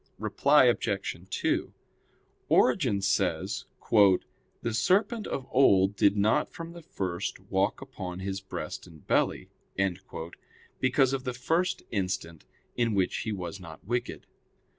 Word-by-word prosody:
Reply - - +4
Obj. - - 0
2: - - -1 0.8
Origen 120 - +3
says, 95 -4 0 0.3
"The 105 +2 +2
serpent 205 - +2
of 135 - -3
old 100 -7 +4
did 100 +1 +3
not 105 +2 +2
from 165 0 -8
the 170 - -10
first 90 - -4
walk - - +1
upon 90 -1 -7
his 95 +1 -4
breast 95 - -6
and 80 -4 -16
belly," - - 0 1.3
because 130 +1 +3
of 135 -1 -2
the 125 -2 -3
first 165 +9 0
instant 90 -5 -3 0.3
in 115 -3 +1
which 95 -2 +1
he 110 - -3
was 95 -1 -5
not 85 -2 -11
wicked. 120 +3 -3
100 Hz, 125 wpm, -28 LUFS, 95-130 Hz, 1.3 s, Reply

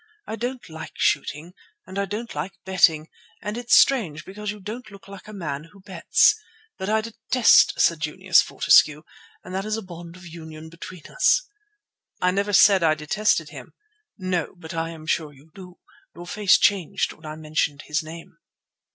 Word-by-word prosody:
I 220 - -5
don't 245 +2 -5
like 160 -1 -9
shooting, 155 +5 -1 0.3
and 190 +1 -6
I 200 - 0
don't 215 +4 -6
like 155 +7 -4
betting; 165 -5 +3 0.3
and 210 0 -5
it's 240 0 +2
strange, 170 - +3
because 210 +2 -7
you 210 0 -5
don't 215 +6 -8
look 200 -1 -15
like 200 +1 -12
a - - -9
man 155 -7 -5
who 195 +4 -19
bets. 185 - +3 0.4
But 190 +1 -3
I 220 0 +2
detest 230 +2 +3
Sir 170 - +4
Junius 170 +4 +2
Fortescue, 150 0 +3 0.4
and 180 - -10
that 190 +1 -2
is 215 +1 -2
a 225 - -6
bond 170 -2 -11
of 185 0 -14
union 160 -1 -10
between 170 0 -11
us." - - +2 0.8
"I 180 - +2
never 200 +2 -1
said 195 -1 +6
I 160 -2 +3
detested 155 +8 0
him." - - -11 0.4
"No, 185 -4 -2
but 165 -2 -9
I 165 0 -2
am 160 -1 -10
sure 155 -1 -1
you 145 +4 -21
do. 180 -2 -13 0.4
Your 175 - -9
face 205 +2 +3
changed 195 -1 +1
when - - -13
I 155 - -6
mentioned 155 -2 -2
his 150 +1 -1
name." 165 +1 -11
180 Hz, 180 wpm, -23 LUFS, 160-205 Hz, 0.8 s, said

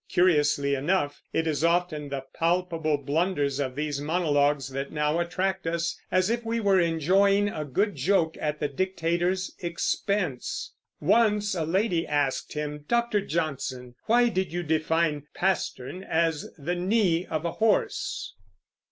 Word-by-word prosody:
Curiously 145 -5 +3
enough, 145 +1 0
it 160 - 0
is 155 -2 -1
often 170 -3 +1
the 135 -1 -4
palpable 165 -3 0
blunders 145 -1 0
of 130 -2 -2
these 145 -1 -2
monologues 145 -4 +1
that 135 +1 -4
now 150 +2 0
attract 185 +1 -1
us, 170 0 -1 0.2
as 185 +3 +2
if 235 0 -1
we 230 0 -1
were 200 -3 +3
enjoying 190 +5 +3
a 155 - -4
good 200 +10 0
joke 160 +2 +2
at 150 0 -2
the 150 - 0
dictator's 180 +3 -1
expense. 175 -3 -2 0.3
Once 210 -3 +3
a 165 -4 -1
lady 180 0 +1
asked 145 -3 0
him, 150 -1 -4
"Dr. 235 -3 +1
Johnson, 135 -8 -3
why 240 +2 +4
did 190 -3 -1
you 175 +1 -2
define 155 -1 0
pastern 185 -3 -1
as 165 -3 0
the 155 +5 -2
knee 180 -1 +1
of 155 +1 -3
a 170 - 0
horse?" 390 - 0
170 Hz, 145 wpm, -27 LUFS, 150-190 Hz, 0.3 s, why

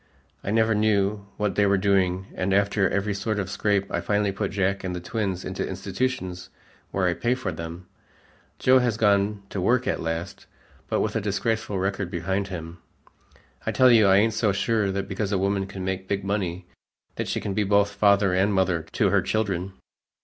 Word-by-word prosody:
I - - -4
never 110 +1 +3
knew 105 -1 +1
what 105 -2 0
they 100 +2 +3
were 100 0 +3
doing, 95 -1 +1
and 95 +1 0
after 100 -1 +2
every 100 +1 -1
sort 105 +2 -2
of 100 - -1
a - - -11
scrape 100 -1 +1
I - - -1
finally 105 -1 +1
put 100 0 -2
Jack 95 0 -1
and 90 -1 -3
the - - -3
twins 95 -1 -3
into - - -3
institutions 95 -9 -3 0.4
where 95 -1 0
I 90 - +2
pay 120 +7 0
for 130 - -3
them. 85 +2 -7 0.7
Joe 130 +7 +5
has 120 -4 0
gone 100 -1 +2
to 95 - -3
work 125 +6 +2
at - - -1
last, 85 +2 -4 0.4
but - - 0
with 105 0 -1
a 115 - +1
disgraceful 105 +1 -1
record 95 0 -1
behind 95 +2 -2
him. 85 -2 -7 0.8
I - - -1
tell 130 -1 +5
you 110 -4 +6
I 95 0 +6
ain't 110 +2 +3
so 105 -1 +1
sure 100 +1 0
that 100 0 -3
because 100 +1 -3
a 100 - +2
woman 95 0 0
can 95 -1 -6
make 95 0 -3
big 100 0 -1
money 95 -3 -2 0.5
that - - -2
she - - -1
can 100 - -3
be 105 - +1
both 100 0 +3
father 100 -1 +3
and 95 +3 +2
mother 95 -3 +2
to 100 - +2
her 100 -1 +4
children." 95 -1 -1
100 Hz, 200 wpm, -25 LUFS, 95-105 Hz, 0.8 s, you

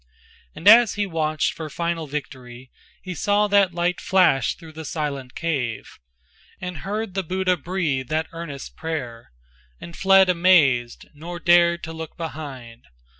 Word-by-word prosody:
And 180 - -4
as 225 0 +7
he 205 0 0
watched 155 -5 -1
for 160 -1 -7
final 170 0 -3
victory 130 -3 -8 0.3
He 185 - -5
saw 205 +4 +1
that 200 -2 +4
light 175 +1 -1
flash 185 - +3
through 165 -2 -13
the 160 +1 -9
silent 140 -5 -4
cave, 135 -9 -3 0.6
And 180 -2 -6
heard 210 0 -4
the 195 - -1
Buddha 185 +1 0
breathe 160 -6 -2
that 155 +1 0
earnest 165 -5 -8
prayer, 125 -8 -6 0.5
And 170 0 -10
fled 195 0 +5
amazed, 165 -10 +3
nor 170 +4 -8
dared 170 0 +4
to 160 - -6
look 160 -1 -8
behind. 135 - -8
165 Hz, 145 wpm, -23 LUFS, 145-185 Hz, 0.6 s, as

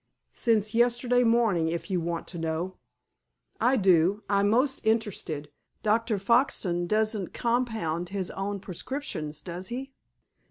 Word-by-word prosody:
"Since 215 -3 +1
yesterday 240 +1 +3
morning, 225 -8 +3
if 170 +4 -3
you 180 -2 +1
want 170 0 -3
to 175 - -6
know." 165 +3 -2 0.8
"I 260 +1 +3
do. 190 0 +3
I'm 200 0 +3
most 260 +5 +2
interested. 205 -10 -1 0.3
Dr. 220 0 +2
Foxton 195 -5 +2
doesn't 215 -1 0
compound 225 -9 -1
his 190 -2 -3
own 200 +1 -3
prescriptions, 175 - -5
does 180 +1 -6
he?" 265 +3 -5
205 Hz, 125 wpm, -28 LUFS, 175-235 Hz, 0.8 s, yesterday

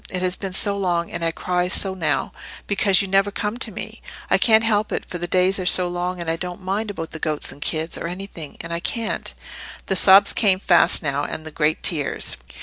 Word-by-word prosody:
It 185 0 -3
has 180 0 +1
been 195 -2 -6
so 200 +1 0
long, 175 -3 -1
and 170 - -4
I 165 - +2
cry 180 +2 -1
so 190 +1 +4
now, 175 -4 -1 0.3
because 200 -1 +2
you - - -4
never 195 +1 +2
come 210 +2 -3
to - - -4
me. - - -7 0.3
I - - +4
can't 220 -1 +5
help 215 -2 +1
it, - - -3
for 175 - -6
the 175 - -4
days 185 +2 +2
are 185 - -4
so 180 0 +5
long, 180 +1 -3
and 170 - -5
I 165 0 -1
don't 180 +2 -5
mind 195 +3 -3
about 165 -5 -6
the 160 - -6
goats 155 -1 -2
and 145 - -13
kids, 160 +2 -3
or - - -4
anything—and 170 -3 -7
I 170 - -2
can't—" 230 +5 -2 0.5
The 190 - -1
sobs 195 +2 +7
came 195 -4 +3
fast 175 -2 +4
now, 145 -1 -1
and 155 - -6
the 155 - -6
great 155 +1 0
tears. 150 -5 0
180 Hz, 230 wpm, -21 LUFS, 165-195 Hz, 0.5 s, sobs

